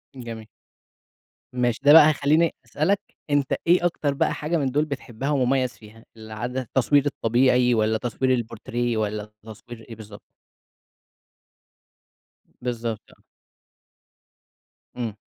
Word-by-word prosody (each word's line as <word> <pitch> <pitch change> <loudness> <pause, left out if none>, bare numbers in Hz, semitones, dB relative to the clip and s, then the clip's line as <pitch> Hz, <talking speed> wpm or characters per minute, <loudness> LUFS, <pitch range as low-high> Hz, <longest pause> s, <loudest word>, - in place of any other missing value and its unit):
جميل. 115 -3 -8 1.1
ماشي، 120 -2 0
ده 145 +1 +7
بقى 155 -2 +9
هيخليني 155 +3 +2
أسألك 170 - 0 0.3
أنت 145 -2 +1
إيه 175 0 +4
أكتر 145 -4 0
بقى - - 0
حاجة 160 +3 -2
من 140 - -1
دول 150 +3 +1
بتحبها 135 -2 -5
ومميّز 130 -2 +1
فيها؟ 110 +1 -16
العد 110 +3 -6
التصوير 135 +3 +1
الطبيعي 125 -1 +2
والَّا 110 0 +1
تصوير 125 +3 -1
البورتريه 120 0 -3
والَّا 105 0 -3
تصوير 115 +1 -11
إيه 115 - -8
بالضبط؟ 105 -1 -12 2.4
بالضبط، 115 -3 -3
آه. - - -24 1.7
امم. 115 -4 -4
125 Hz, 115 wpm, -24 LUFS, 115-140 Hz, 2.4 s, بقى